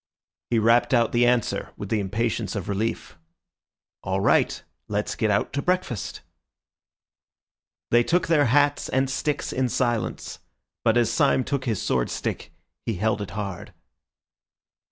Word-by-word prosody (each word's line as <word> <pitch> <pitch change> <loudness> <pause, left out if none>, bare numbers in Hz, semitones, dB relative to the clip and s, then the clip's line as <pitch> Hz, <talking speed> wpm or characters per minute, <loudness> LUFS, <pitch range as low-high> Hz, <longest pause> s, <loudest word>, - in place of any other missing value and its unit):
He 120 - +2
rapped 115 +2 +4
out 115 -1 +3
the 120 0 +3
answer 120 -2 0
with - - -6
the 110 - +1
impatience 105 +1 -2
of 100 -3 -4
relief— 100 -3 -3 0.8
"All - - -1
right. - - +2 0.2
Let's 105 0 -2
get 110 - 0
out 105 - 0
to 140 - -1
breakfast." 180 - -2 1.7
They 120 - +6
took 175 +6 +1
their 155 -3 +3
hats 145 +4 +2
and 130 +1 +1
sticks 145 +1 -2
in 130 -1 0
silence; 120 -2 -2 0.4
but 115 0 +3
as 120 -2 +3
Syme 140 -3 +3
took 135 0 -2
his 110 -6 -1
sword 60 -1 0
stick, - - -4 0.3
he 115 - -2
held 105 +2 0
it 100 - -5
hard. 100 -3 -5
120 Hz, 145 wpm, -25 LUFS, 105-130 Hz, 1.7 s, They